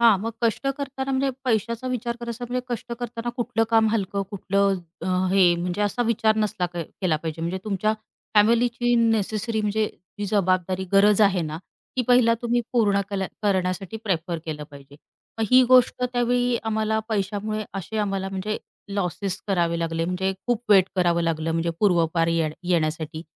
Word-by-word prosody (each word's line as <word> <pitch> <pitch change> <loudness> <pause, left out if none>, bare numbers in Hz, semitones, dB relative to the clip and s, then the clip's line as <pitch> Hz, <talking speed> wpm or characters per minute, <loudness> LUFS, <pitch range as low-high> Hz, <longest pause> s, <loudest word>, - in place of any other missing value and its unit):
हां, 230 -4 +6
मग 225 +3 -3
कष्ट 230 +4 0
करताना 275 -1 -4
म्हणजे 270 +1 +1
पैशाचा 230 +1 0
विचार 240 -1 -2
करायचा 235 +1 -5
म्हणजे 250 0 -1
कष्ट 240 0 -4
करताना 240 0 -4
कुठलं 235 -2 0
काम 225 -1 +4
हलकं, 200 -2 -1
कुठलं 200 0 +1 0.3
हं, 185 0 +1
हे 180 -3 +5
म्हणजे 180 +3 -3
असा 205 +4 0
विचार 220 -1 +2
नसला 210 -4 0
केला 170 0 -1
पाहिजे 160 +1 -5
म्हणजे 180 +3 -2
तुमच्या 215 +1 0 0.4
फॅमिलीची 240 +3 +3
नेसेसरी 220 -1 +1
म्हणजे 210 +1 +1 0.3
जी 205 - -2
जबाबदारी 185 -2 +1
गरज 205 +1 +5
आहे 195 -3 +4
ना, 155 0 -4 0.4
ती 250 - +2
पहिला 240 -2 +5
तुम्ही 240 0 +1
पूर्ण 205 -4 +3
केल्या 195 -1 -1 0.2
करण्यासाठी 190 +1 0
प्रिफर 170 -3 -1
केलं 150 -2 -5
पाहिजे. 140 0 -14 0.4
मग 225 - +1
ही 255 0 +8
गोष्ट 250 0 +5
त्यावेळी 245 0 +1
आम्हाला 220 0 0
पैशामुळे 215 +1 -2
असे 195 +3 -5
आम्हाला 195 -2 -1
म्हणजे 195 +2 -3 0.3
लॉसेस 195 0 -2
करावे 170 -4 +1
लागले 165 0 -1
म्हणजे 185 +2 -1
खूप 240 -1 0
वेट 190 -3 +7
करावं 170 -2 +2
लागलं 165 -1 -1
म्हणजे 165 +1 0
पूर्वपार 170 -4 +3
ये 165 -2 +1 0.2
येण्यासाठी 160 -1 -1
205 Hz, 160 wpm, -24 LUFS, 180-230 Hz, 0.4 s, ही